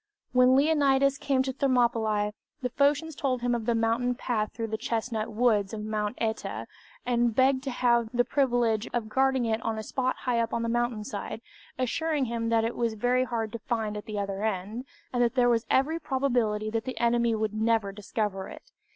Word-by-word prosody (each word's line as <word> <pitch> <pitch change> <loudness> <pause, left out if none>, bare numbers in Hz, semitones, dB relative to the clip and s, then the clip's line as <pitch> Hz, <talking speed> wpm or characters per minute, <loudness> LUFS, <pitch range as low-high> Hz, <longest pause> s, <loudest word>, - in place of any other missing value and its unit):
When 250 +1 +5
Leonidas 275 -2 +3
came 270 -2 +1
to 265 0 -3
Thermopylć, 230 -6 +1 0.3
the 250 - 0
Phocians 290 +4 +2
told 255 -4 -1
him 245 0 +1
of 235 -1 -2
the 235 - +2
mountain 230 +2 +1
path 220 -4 -1
through 225 0 -4
the 220 - -1
chestnut 225 -1 -2
woods 215 -3 +2
of 210 - -5
Mount 215 +1 -2
Śta, 220 -1 -3 0.4
and 240 -2 +1
begged 260 0 +4
to - - -1
have 235 -2 +2
the 245 0 +2
privilege 240 -5 +1
of 230 -3 -2
guarding 265 0 +2
it 225 0 0
on 225 -1 -2
a 220 - -4
spot 255 +3 -1
high 245 -2 0
up 230 0 0
on 230 - -1
the 230 - -1
mountain 240 -2 0
side, 210 +1 -5 0.4
assuring 300 +3 0
him 230 -1 -2
that 225 -1 +3
it 230 - -2
was 230 -2 -1
very 250 +3 +2
hard 225 -3 -3
to 230 - -5
find 220 -2 -2
at 210 - -6
the 215 -1 -5
other 200 0 -3
end, 215 +4 -2 0.3
and 245 - +1
that 240 +1 +2
there 245 -2 +4
was 230 -1 +1
every 305 +5 +2
probability 240 -7 0
that 225 +1 -2
the 255 - -5
enemy 235 -1 +2
would 215 -1 -1
never 220 -2 +1
discover 200 -1 -3
it. - - -13
235 Hz, 205 wpm, -28 LUFS, 220-255 Hz, 0.4 s, When